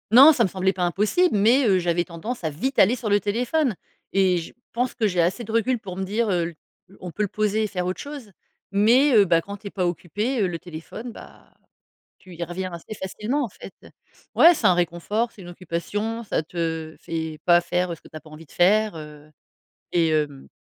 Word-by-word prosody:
Non 275 +7 +9
ça 245 - +2
me 195 - +1
semblait 190 +1 0
pas 185 - -2
impossible, 210 - +2
mais, 235 +7 +4
heu, 195 -4 +4
j'avais 175 0 +1
tendance 180 +7 -6
à 160 - 0
vite 260 - -3
aller 225 +7 +5
sur 225 -3 -4
le 205 0 +3
téléphone 245 - 0 0.4
et 190 -2 +3
je 165 - -8 0.2
pense 245 +1 -1
que 225 -3 +1
j'ai 180 -3 +1
assez 185 +8 0
de 220 - -7
recul 235 +2 +1
pour 190 -4 -8
me 190 - -3
dire, 215 +4 -1
heu: 175 -2 0 0.5
«On 180 - -7
peut 210 - -4
le 205 - -1
poser 215 +1 0
et - - 0
faire 180 -3 -3
autre 185 +1 -3
chose», 280 -7 -9 0.4
mais, 240 +8 +4
heu, 210 - +7
bah, 170 -2 +3
quand 200 +4 -8
tu 205 +1 -10
es - - -4
pas 185 -3 -1
occupée, 210 - -2
heu, 195 - +2
le 170 -2 -4
téléphone, 175 +8 -8
bah, - - -15 0.6
tu 185 - -15
y 170 - -4
reviens 185 +2 -5
assez 170 +5 -8
facilement, 215 +9 -2
en - - -2
fait. 190 - -12 0.6
Ouais, 345 - +7
c'est - - -4
un - - +6
réconfort, 175 +7 -1
c'est 210 - -15
une 175 - -10
occupation, 205 +6 -4
ça 210 - -1
te 160 -1 -4
fait 160 -2 -5
pas 175 -1 +6
faire 175 0 -1
ce - - -23
que - - -16
tu - - -16
as - - -8
pas 155 - -17
envie 155 +1 -12
de - - -22
faire, 210 +3 +3
heu 150 -1 -11 0.6
et 165 -2 +2
heu, 145 -3 -1
190 Hz, 225 wpm, -24 LUFS, 170-225 Hz, 0.6 s, Non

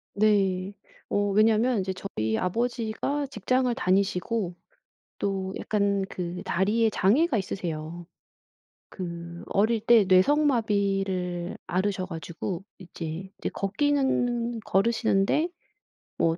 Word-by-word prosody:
네 200 -2 +2 0.4
어 205 0 +1
왜냐면 220 +3 +3
이제 190 0 -2
저희 110 - -2
아버지가 235 +7 -1
직장을 255 0 0
다니시고 195 -2 0 0.6
또 190 -1 -2
약간 200 -2 +1
그 180 0 -5
다리에 215 +5 +2
장애가 235 - +3
있으세요. 170 -3 -4 0.9
그 170 -2 -7
어릴 220 +3 +2
때 225 -1 +5
뇌성마비를 195 - +2
앓으셔 185 0 -1
가지고 170 +2 -5 0.2
이제, 170 -1 -6
이제 - - -2
걷기는 240 0 0
걸으시는데 220 - +2 0.7
뭐 165 0 +2
200 Hz, 225 characters per minute, -27 LUFS, 185-230 Hz, 0.9 s, 때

